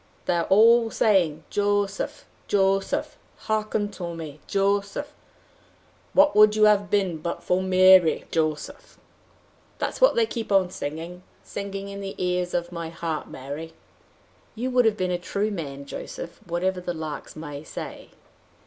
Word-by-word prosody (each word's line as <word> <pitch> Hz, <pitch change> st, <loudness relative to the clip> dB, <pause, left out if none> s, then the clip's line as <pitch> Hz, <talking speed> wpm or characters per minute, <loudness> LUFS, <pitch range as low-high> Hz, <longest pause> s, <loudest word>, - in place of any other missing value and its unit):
They -, -, +1 dB
are 170 Hz, -, 0 dB
all 230 Hz, +3 st, +5 dB
saying: 175 Hz, -9 st, +2 dB
'Jo 205 Hz, 0 st, +2 dB
seph! 195 Hz, -, -6 dB, 0.2 s
Jo 195 Hz, -1 st, +3 dB
seph! 195 Hz, -, -4 dB, 0.3 s
Hearkentome, 195 Hz, -8 st, -3 dB
Joseph! 200 Hz, +7 st, 0 dB, 1.0 s
Whatwouldyouhavebeenbutfor 205 Hz, -, +3 dB
Ma 185 Hz, 0 st, +7 dB
ry, 160 Hz, -, 0 dB
Jo 155 Hz, -2 st, +2 dB
seph?' -, -, -12 dB, 0.8 s
That's -, -, -3 dB
what -, -, +6 dB
they 470 Hz, -1 st, +4 dB
keep 230 Hz, -, -5 dB
on 190 Hz, -2 st, +3 dB
singing, 165 Hz, +3 st, -6 dB, 0.2 s
singing 200 Hz, 0 st, -6 dB
in 200 Hz, 0 st, -7 dB
the 195 Hz, 0 st, -6 dB
ears 180 Hz, 0 st, -1 dB
of 175 Hz, 0 st, -2 dB
my 170 Hz, -2 st, -5 dB
heart, 165 Hz, -2 st, -4 dB
Mary!" 145 Hz, +5 st, -7 dB, 0.8 s
"You 250 Hz, +3 st, -2 dB
would 250 Hz, -1 st, +4 dB
have 220 Hz, -1 st, +3 dB
been 185 Hz, -2 st, -1 dB
a 175 Hz, -, -1 dB
true 200 Hz, +4 st, -2 dB
man, 140 Hz, -7 st, -6 dB
Joseph, 170 Hz, +4 st, -7 dB
whatever 180 Hz, +2 st, -1 dB
the 175 Hz, -1 st, -4 dB
larks 155 Hz, -2 st, -6 dB
may 150 Hz, -2 st, -7 dB
say." -, -, -8 dB
190 Hz, 135 wpm, -25 LUFS, 165-205 Hz, 1.0 s, Ma